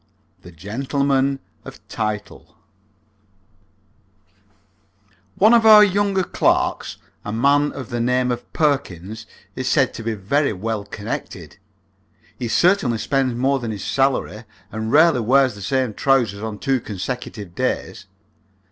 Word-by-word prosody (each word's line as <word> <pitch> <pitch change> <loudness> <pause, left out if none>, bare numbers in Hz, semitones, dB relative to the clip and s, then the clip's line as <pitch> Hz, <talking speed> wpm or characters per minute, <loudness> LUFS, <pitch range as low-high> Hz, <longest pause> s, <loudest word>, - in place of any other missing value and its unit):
THE 90 - -13
GENTLEMAN 135 - -1 0.3
OF - - -13
TITLE 105 -1 -5 2.8
One 215 +4 +5
of 235 -1 +5
our 215 -1 +9
younger 200 -1 +1
clerks, - - 0 0.3
a 105 - -5
man 140 +6 +2
of 130 -5 -8
the 120 - -2
name 125 +1 +1
of 120 0 -6
Perkins, 110 - -2 0.3
is 130 - -4
said 135 -1 +2
to - - -7
be 115 0 -2
very 140 +8 0
well 105 +1 -4
connected. 105 0 -7 0.8
He 120 - -4
certainly 135 - +2
spends 130 +1 0
more 135 +3 +1
than 120 -3 -5
his 105 -3 -5
salary, 135 -5 -1 0.3
and 110 +1 -4
rarely 155 -1 +5
wears 130 +2 +3
the 100 - -11
same 130 +2 -1
trousers 120 -6 +1
on 110 -1 -5
two 135 +3 0
consecutive 105 -2 -6
days. 95 +2 -3
125 Hz, 130 wpm, -21 LUFS, 110-140 Hz, 2.8 s, our